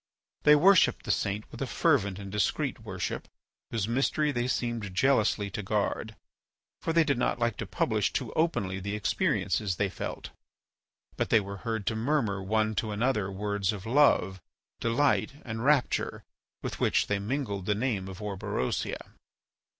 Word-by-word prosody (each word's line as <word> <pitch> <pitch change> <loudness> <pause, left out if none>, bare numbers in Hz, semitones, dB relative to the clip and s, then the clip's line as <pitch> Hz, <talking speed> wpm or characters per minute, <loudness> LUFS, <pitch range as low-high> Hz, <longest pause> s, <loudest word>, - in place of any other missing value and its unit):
They 150 - +8
worshipped 185 +4 +5
the - - +1
saint 100 +2 -1
with - - -9
a - - -1
fervent 95 -1 +2
and 100 -1 -7
discreet 105 -1 0
worship - - -4 0.4
whose 110 -3 -1
mystery 140 +5 +1
they 120 -2 -1
seemed 115 -6 -2
jealously 110 -4 +2
to 105 - -3
guard, 105 +2 -1 0.7
for - - -1
they 165 0 +5
did 140 -5 0
not - - +1
like 120 -2 0
to - - -4
publish - - 0
too - - -3
openly 100 - 0
the 100 +2 -3
experiences 105 -1 0
they 100 +2 0
felt. - - -6 0.9
But - - -1
they 115 - +6
were 100 -1 -6
heard 110 -1 -3
to 110 - 0
murmur 110 -5 0
one 110 +2 +1
to 110 - 0
another 105 -2 0
words 100 0 -1
of 105 -1 -7
love, 110 -8 +3 0.4
delight, 135 +4 +2
and 115 -1 -4
rapture 140 -1 +1 0.4
with - - -4
which - - +2
they 105 -1 0
mingled 100 -4 -3
the 105 - +2
name 105 -4 -1
of 95 +1 -8
Orberosia. 100 -8 -3
110 Hz, 160 wpm, -29 LUFS, 100-125 Hz, 0.9 s, They